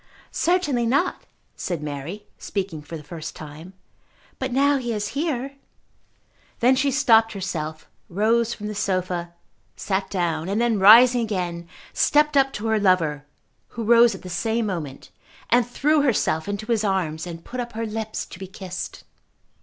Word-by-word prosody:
"Certainly 295 -10 +1
not," 280 +9 0 0.3
said 170 -5 -4
Mary, 150 +8 -6
speaking 185 -6 -4
for 160 +3 -8
the 150 - -11
first 160 +1 -8
time. 155 +4 -10 0.7
"But 260 -1 -2
now 280 +3 +3
he 240 -3 -3
is 210 -1 -2
here 275 -2 -3 0.5
" - - -37
Then 250 +2 +4
she 280 +2 +2
stopped 230 -5 +4
herself, 160 -5 -5 0.2
rose 225 +5 +2
from 210 - -6
the 210 - -3
sofa, 185 -4 -2 0.4
sat 195 -1 -2
down, 170 -2 -1
and 205 +3 0
then 235 -3 +1
rising 240 +5 +8
again, 175 -6 -3 0.2
stepped 300 0 +3
up 270 -1 +4
to 210 - -5
her 220 -1 +2
lover, 160 -7 +1 0.4
who 230 - -6
rose 235 -1 +5
at - - -12
the - - -8
same 225 +5 -1
moment, 160 -9 -5 0.4
and 240 0 +4
threw 295 +5 +2
herself 205 - +1
into 205 +3 -3
his 220 -2 +1
arms 180 -5 -1
and 165 -1 -8
put 255 - -6
up 240 -1 -4
her 225 +1 -3
lips 220 0 -4
to 175 - -12
be 190 - -7
kissed. 185 -1 -7
210 Hz, 165 wpm, -23 LUFS, 175-240 Hz, 0.7 s, rising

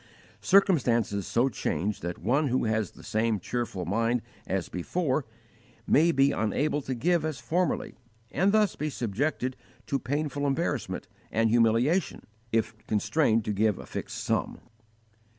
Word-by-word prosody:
Circumstances 120 - +3
so 120 +3 +2
change 105 - -2
that 85 +1 -4
one 135 - +1
who 130 -1 +1
has 110 -4 0
the - - -16
same 110 -1 0
cheerful 105 -3 -3
mind 115 +4 +1 0.2
as 95 -2 -1
before 135 - -1 0.6
may 165 +4 +4
be 140 -2 +4
unable 145 +8 0
to 130 -1 -3
give 170 +6 +2
as 155 -3 -2
formerly, 170 +9 -1 0.4
and 195 +2 +2
thus 210 -1 +3
be 155 - -2
subjected 130 +2 -2 0.3
to 140 - -1
painful 145 +2 -2
embarrassment 135 - -2 0.2
and 115 0 +2
humiliation 120 +9 +2 0.3
if 110 0 0
constrained 110 +1 +2
to 105 - -1
give 105 0 +2
a - - -9
fixed - - -5
sum. - - -1
125 Hz, 140 wpm, -28 LUFS, 110-150 Hz, 0.6 s, may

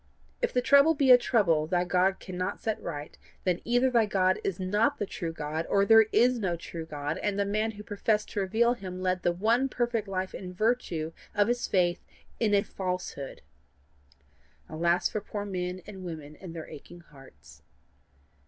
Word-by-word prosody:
If 485 - +1
thy 250 - +1
trouble 280 +5 +5
be 275 -2 +4
a 250 - +11
trouble 170 -11 +2
thy 175 +1 +1
God 185 +2 +1
cannot 185 -1 -4
set 220 -1 -3
right, 150 -3 -6 0.3
then 180 -2 0
either 245 +2 +2
thy 230 -3 +3
God 185 -2 +2
is 195 -1 -2
not 205 +4 +1
the 205 - -2
true 170 -3 -5
God, 155 +1 -4
or 200 0 +3
there 225 0 +7
is 245 0 +4
no 185 -5 -1
true 165 -1 -7
God, 145 0 -4
and 205 -1 -1
the 200 - +1
man 215 +2 -1
who 210 0 -10
professed 210 +1 -1
to - - -2
reveal 225 +5 +2
him 185 -5 -7
led 185 0 0
the 175 - +2
one 225 +9 +1
perfect 240 -4 -1
life 190 -1 -3
in 180 -1 -7
virtue 185 -7 0 0.2
of 205 +1 +3
his 240 0 0
faith 175 -2 +1 0.4
in 210 -3 +3
a 200 - +3
falsehood. 180 -7 -5 1.2
Alas 170 +3 +1
for 215 - -4
poor 205 0 -5
men 180 -2 -4
and 195 -3 -9
women 155 -4 -7
and 170 0 -10
their 160 - -7
aching 175 +4 -12
hearts! 135 - -17
190 Hz, 185 wpm, -28 LUFS, 175-220 Hz, 1.2 s, a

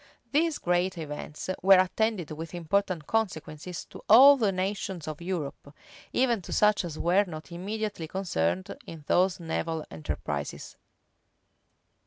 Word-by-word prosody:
These 315 +2 +2
great 180 +1 0
events 150 -1 -6
were 195 +1 +7
attended 185 -2 0
with 160 +2 -6
important 175 -1 -1
consequences 180 -5 -3
to - - -12
all 270 +6 +10
the 220 -7 +1
nations 190 -2 -3
of 155 +1 -6
Europe, 155 -5 -5 0.4
even 240 -5 +2
to - - -10
such 210 -1 +3
as 165 -3 -6
were 185 +5 +3
not 160 -1 -9
immediately 200 0 -4
concerned 95 - -1
in 160 -2 -9
those 185 +3 +2
naval 165 -1 -3
enterprises. 75 -2 -5
180 Hz, 130 wpm, -28 LUFS, 155-200 Hz, 0.4 s, all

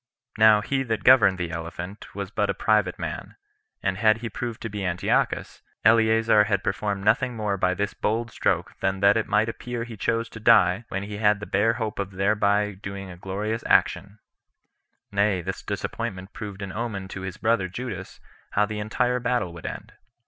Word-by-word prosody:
Now 110 -1 +7
he 135 +5 -1
that 110 -5 -2
governed 105 -8 +6
the 90 -2 -3
elephant 85 +4 -7
was 100 -2 -5
but 105 -1 0
a 100 - 0
private 105 +1 +1
man; - - -6 0.5
and 95 0 -1
had 110 0 +4
he 115 -1 -6
proved 120 0 -4
to - - -2
be 105 -1 -5
Antiochus, 90 -1 0 0.2
Eleazar 110 -1 +5
had 100 -2 0
performed 100 0 -2
nothing 120 +3 +2
more 105 -2 -1
by 90 -1 +1
this 100 +1 -2
bold 115 +2 -1
stroke - - 0
than 95 0 -1
that 100 0 +6
it 110 - 0
might 110 +2 +2
appear 120 +1 -4
he 115 -1 -8
chose 115 +3 -1
to 110 - -10
die, 110 -2 +4
when 95 +1 -3
he 105 0 -6
had 105 -1 +3
the 105 - -6
bare 105 +4 +2
hope 110 -4 -4
of 100 -1 -3
thereby 105 +1 +2
doing 100 0 -7
a - - -9
glorious 105 +5 -3
action; 100 +2 +2 0.9
nay, 100 -1 +2
this 95 +2 -5
disappointment 95 +1 -5
proved 105 -5 -7
an 95 - -5
omen 105 -4 -4
to 95 - -6
his 95 -1 -6
brother 110 -4 +1
[Judas] 95 -2 -7 0.3
how 105 - +3
the 105 0 -5
entire 125 +4 0
battle 120 -8 -1
would 85 - -7
end. - - -7
105 Hz, 190 wpm, -25 LUFS, 95-110 Hz, 0.9 s, Now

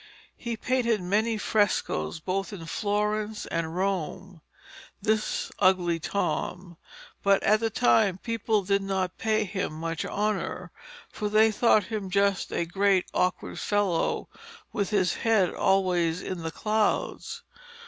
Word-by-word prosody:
He 235 -2 -4
painted 235 -2 +1
many 215 +5 0
frescoes 205 - 0
both 195 +5 -2
in 180 -5 -7
Florence 210 +3 -1
and 165 0 -3
Rome, 185 -1 -3 0.6
this 215 +1 -1
Ugly 180 -3 +3
Tom, 180 -1 -3 0.4
but 200 -1 +3
at 215 +1 +4
the 225 0 0
time 220 -4 +3
the - - -15
people 225 -2 0
did 200 +1 +1
not 190 -2 -2
pay 220 -1 +1
him 190 -5 -3
much 165 +1 -3
honour, 210 0 -2 0.4
for 210 -1 -3
they 220 +1 +5
thought 215 -1 +4
him 205 -1 -4
just 200 0 +1
a 170 - -1
great 195 +1 +2
awkward 180 0 -1
fellow 205 -5 0 0.5
with 205 -4 -1
his 190 -5 +2
head 215 -6 +2
always 180 -3 +1
in 185 - -4
the 165 - -3
clouds. 215 +5 -1
200 Hz, 135 wpm, -27 LUFS, 180-215 Hz, 0.6 s, they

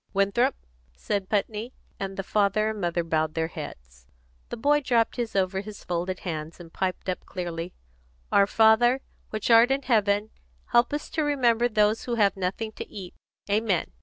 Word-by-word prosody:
"Winthrop," 220 +7 +2 0.4
said 190 - -2
Putney, 215 +3 -1 0.3
and 195 0 -4
the 195 - -2
father 210 +2 +1
and 215 -2 -6
mother 175 -1 0
bowed 155 -1 0
their 160 0 0
heads. 60 - -10 0.4
The - - -5
boy 290 +5 +3
dropped 235 -4 +1
his 235 -3 -3
over 190 0 +1
his 210 0 -10
folded 180 +1 -3
hands, 160 -2 -5
and 165 -1 -12
piped 185 -1 -2
up 185 - -2
clearly: 175 -1 -5 0.6
"Our 200 0 +5
Father, 225 +5 +4 0.3
which 215 +2 -2
art 230 +2 +7
in 270 +1 0
heaven, 210 -3 +2 0.4
help 240 0 +4
us 295 +1 -3
to 320 - 0
remember 245 -5 +2
those 215 0 +2
who 240 - -1
have 205 -3 +3
nothing 195 +4 -3
to - - -6
eat. 185 -3 -8 0.3
Amen!" 205 - +1
205 Hz, 170 wpm, -26 LUFS, 180-230 Hz, 0.6 s, art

